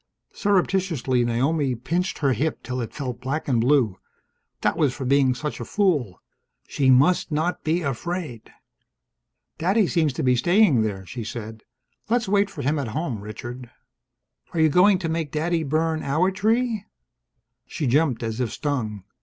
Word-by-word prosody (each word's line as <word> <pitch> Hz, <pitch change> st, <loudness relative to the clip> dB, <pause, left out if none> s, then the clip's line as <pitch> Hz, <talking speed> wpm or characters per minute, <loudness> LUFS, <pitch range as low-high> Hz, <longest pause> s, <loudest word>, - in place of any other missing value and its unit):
Surreptitiously 180 Hz, -, +1 dB
Naomi 130 Hz, +3 st, +1 dB
pinched 170 Hz, +10 st, -2 dB
her 140 Hz, -3 st, +2 dB
hip 155 Hz, +4 st, -2 dB
till 125 Hz, 0 st, -3 dB
it 115 Hz, -, -5 dB
felt 125 Hz, -4 st, -5 dB
black 140 Hz, +5 st, -3 dB
and 120 Hz, -5 st, +2 dB
blue. 120 Hz, -7 st, +2 dB, 0.6 s
That -, -, +1 dB
was 150 Hz, -6 st, +1 dB
for 135 Hz, -, -5 dB
being 135 Hz, -1 st, +3 dB
such 150 Hz, +4 st, -4 dB
a -, -, -4 dB
fool. 150 Hz, -, 0 dB, 0.5 s
She 135 Hz, -2 st, +1 dB
must 145 Hz, +7 st, +4 dB
not 160 Hz, +4 st, -1 dB
be 165 Hz, +3 st, 0 dB
afraid! 145 Hz, -2 st, -4 dB, 1.1 s
"Daddy 195 Hz, +6 st, +3 dB
seems 165 Hz, -4 st, +1 dB
to -, -, -3 dB
be 125 Hz, -1 st, +3 dB
staying 175 Hz, -, +4 dB
there," 100 Hz, -3 st, -3 dB
she 115 Hz, +5 st, -6 dB
said. 110 Hz, 0 st, -7 dB, 0.5 s
"Let's 235 Hz, -1 st, +1 dB
wait 200 Hz, 0 st, +2 dB
for 150 Hz, -7 st, -7 dB
him 145 Hz, +3 st, +1 dB
at 135 Hz, -, -3 dB
home, 135 Hz, -10 st, -3 dB
Richard." 120 Hz, +4 st, -8 dB, 0.9 s
"Are -, -, 0 dB
you 160 Hz, 0 st, +5 dB
going 185 Hz, +5 st, +5 dB
to 175 Hz, -2 st, -3 dB
make 160 Hz, -2 st, -2 dB
Daddy 165 Hz, +2 st, 0 dB
burn 160 Hz, +2 st, 0 dB
our 160 Hz, +7 st, +1 dB
tree?" 220 Hz, +2 st, 0 dB, 0.8 s
She 150 Hz, -, -4 dB
jumped 135 Hz, -1 st, +2 dB
as 115 Hz, +1 st, -3 dB
if 125 Hz, -3 st, -1 dB
stung. 115 Hz, -10 st, -3 dB
145 Hz, 160 wpm, -24 LUFS, 125-175 Hz, 1.1 s, you